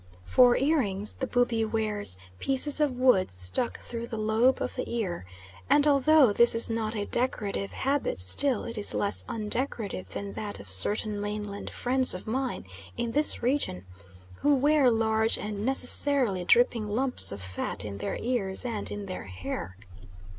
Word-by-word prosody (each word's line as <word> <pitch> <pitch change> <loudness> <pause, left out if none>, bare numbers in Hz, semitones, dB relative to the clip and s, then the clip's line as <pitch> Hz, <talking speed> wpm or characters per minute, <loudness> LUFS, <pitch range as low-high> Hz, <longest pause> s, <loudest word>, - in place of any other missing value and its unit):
For 250 - +4
earrings 215 -9 -1
the 265 - -5
Bubi 245 -2 0
wears 215 - -2 0.2
pieces 275 +2 -1
of 285 -5 0
wood 250 -7 +3
stuck 90 - -2
through 235 0 -7
the 225 - -6
lobe 220 +4 +1
of - - -4
the 255 - -5
ear, 185 - -4 0.4
and 290 - +4
although 285 -4 +4
this 235 +2 +5
is 230 0 +4
not 225 -1 -3
a 205 -1 -3
decorative 205 -5 -2
habit 275 - -2
still 210 - +1
it 230 -2 -7
is 205 - +1
less 205 - -1
undecorative 215 - -3
than 100 +1 -7
that 100 -1 -4
of 100 -1 -6
certain 205 - +3
mainland 205 -1 -6
friends 255 -3 0
of 180 - -9
mine 255 - -4 0.3
in 235 - -3
this 295 -1 +2
region, 240 - -2 0.5
who 290 - +2
wear 285 0 +3
large 220 -1 +1
and 205 -1 -6
necessarily 255 -5 +5
dripping 230 +1 +2
lumps 255 +4 +2
of 100 - -7
fat 95 +2 -5
in 100 -1 -7
their 200 - -4
ears 230 -4 -1
and 225 -4 -3
in 205 -1 -6
their 185 - -7
hair. 95 0 -7
225 Hz, 160 wpm, -27 LUFS, 195-255 Hz, 0.5 s, this